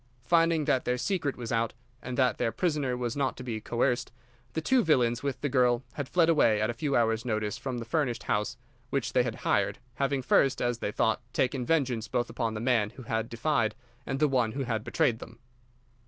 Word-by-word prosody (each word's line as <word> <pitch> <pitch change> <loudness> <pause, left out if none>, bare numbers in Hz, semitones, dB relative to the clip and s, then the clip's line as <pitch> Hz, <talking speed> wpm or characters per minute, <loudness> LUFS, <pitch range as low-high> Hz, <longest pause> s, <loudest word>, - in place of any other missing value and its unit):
Finding 165 -2 +3
that 130 - +2
their 125 0 0
secret 160 -1 -1
was 120 -2 -5
out, 115 0 0 0.3
and 125 0 -5
that 130 -2 +2
their 115 - +1
prisoner 140 -2 0
was 120 -2 -2
not 140 -2 -1
to 125 - -7
be 115 -3 -4
coerced, 120 +2 0 0.4
the - - -1
two 255 +10 +3
villains 120 -7 +2
with 140 -1 -3
the 145 - 0
girl 125 -2 +2
had 145 -3 -5
fled 170 -2 +3
away 130 -10 +4
at 110 +2 +1
a - - -6
few 140 +4 -1
hours' 115 -1 +2
notice 110 -3 -1
from 130 -2 -4
the 115 - -5
furnished 125 -1 -1
house 105 +3 -1 0.3
which 135 -2 -1
they 125 - +5
had 120 -2 -2
hired, - - +2 0.2
having 135 -1 0
first, 135 +1 +3
as 120 -1 0
they 105 - -2
thought, 110 +1 +1
taken 125 -1 0
vengeance 130 -9 +1
both 120 +2 -1
upon 115 -3 -2
the - - -3
man 115 -3 +2
who 130 +3 -12
had 115 0 -2
defied 115 -2 0 0.3
and 135 +2 -3
the 150 - +4
one 125 -5 +1
who 135 - -2
had 115 -3 -2
betrayed 130 -7 +1
them. 115 -1 -11
125 Hz, 215 wpm, -29 LUFS, 115-140 Hz, 0.4 s, they